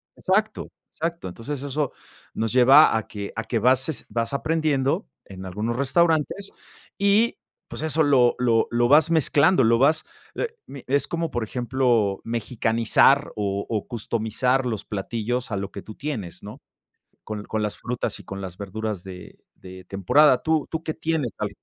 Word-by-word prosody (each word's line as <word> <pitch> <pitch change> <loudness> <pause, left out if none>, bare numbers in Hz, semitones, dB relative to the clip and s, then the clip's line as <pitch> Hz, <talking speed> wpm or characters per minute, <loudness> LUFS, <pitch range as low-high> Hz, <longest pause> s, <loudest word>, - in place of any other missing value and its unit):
Exacto, - - 0 0.2
exacto. 165 - -4
Entonces 130 +9 -6
eso 145 0 -2 0.4
nos 115 0 -2
lleva 130 +2 +7
a 110 - -4
que 100 -1 -7
a, 115 - -3
¿qué 115 +1 -1
bases 130 +5 +1
vas 115 -1 -2
aprendiendo 155 +2 0 0.2
en 95 -1 -10
algunos 105 +6 -3
restaurantes? 160 +7 +1 0.5
Y, 200 +4 +3 0.3
pues, - - -8
eso 160 0 +1
lo 130 -4 +4
lo 115 -2 +2
lo 120 0 +2
vas 150 +5 +5
mezclando, 160 0 +4
lo 115 +1 +4
vas, 155 +4 +3 0.3
eh, 485 - -1 0.2
mi 140 - -10
es 140 +2 +1
como, 170 -1 -3
por 120 - -2
ejemplo, 120 -4 0
mexicanizar 115 +4 +2
o 100 -1 -2
o 110 -3 -3
customizar 120 +2 -1
los 110 -5 -3
platillos 115 +5 -3
a 100 - -1
lo 100 0 -4
que 100 - -7
tú 110 - -11
tienes, 125 - -5
¿no? - - -10 0.6
Con 105 -1 -6
con 110 0 -2
las 105 -1 -3
frutas 125 -1 -4
y - - -13
con 95 0 -7
las 95 -2 -7
verduras 105 -1 -4
de 90 -1 -11 0.2
de 95 0 -12
temporada, 125 - +4
¿tú 160 -2 0
tú 160 0 -3
qué 155 - -3
tienes 160 -7 -2
al 105 - -1
125 Hz, 165 wpm, -24 LUFS, 110-150 Hz, 0.6 s, lleva